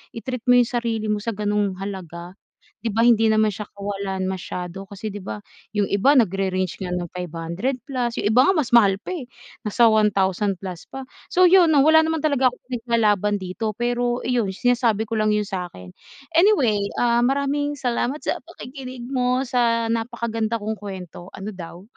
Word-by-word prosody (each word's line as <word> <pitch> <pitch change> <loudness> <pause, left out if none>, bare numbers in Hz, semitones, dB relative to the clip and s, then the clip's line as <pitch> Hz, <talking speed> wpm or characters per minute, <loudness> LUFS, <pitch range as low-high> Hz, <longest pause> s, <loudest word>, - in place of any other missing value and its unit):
i-treat 250 +1 -5
mo 245 - +6
yung 245 -1 +3
sarili 225 -2 -2
mo 210 - 0
sa 225 +1 -4
gano'ng 205 -1 0
halaga. 180 -3 -7 0.5
'Di 230 - -1
ba 215 - -2
hindi 225 -2 +4
naman 215 0 +3
siya 210 0 -3
kawalan 195 -2 -4
masyado 185 0 -5
kasi 200 +2 -6
'di 205 -2 -6
ba 105 -1 -5 0.3
yung 205 -2 0
iba 260 +9 +3
nagre-range 190 -3 -1
nga 180 - -4
ng 180 -1 -2
500 175 - -3
plus, 245 -3 -2
yung 205 - 0
iba 245 +5 +5
nga 380 - +4
mas 295 -8 0
mahal 200 -4 +5
pa, 220 - -7
eh, 295 - -5 0.4
nasa 230 +2 +4
1,000 200 -3 +2
plus 185 -3 -7
pa. 270 -1 -7 0.2
So, 365 0 +6
yun 350 -3 +6
'no, 290 - +5
wala 320 0 +7
naman 320 0 -1
talaga 280 -4 +2
akong 250 - -16
pinaglalaban 215 -5 +1
dito, 195 +4 -3
pero 240 0 0
iyon 235 -6 +1
sinasabi 230 -1 +1
ko 225 - -3
lang 215 0 +2
yun 210 -1 0
sakin. 175 - -7 0.4
Anyway, 330 - +4 0.2
ah, 240 0 +3
maraming 280 +2 0
salamat 250 +3 -1
sa - - -2
pakikinig 255 -2 -9
mo 255 0 0
sa 230 -2 +1
napakaganda 230 -1 -2
kong 215 +1 -3
kwento, 190 -3 -9
ano 200 +3 -7
daw. 175 0 -9
220 Hz, 180 wpm, -22 LUFS, 195-250 Hz, 0.5 s, wala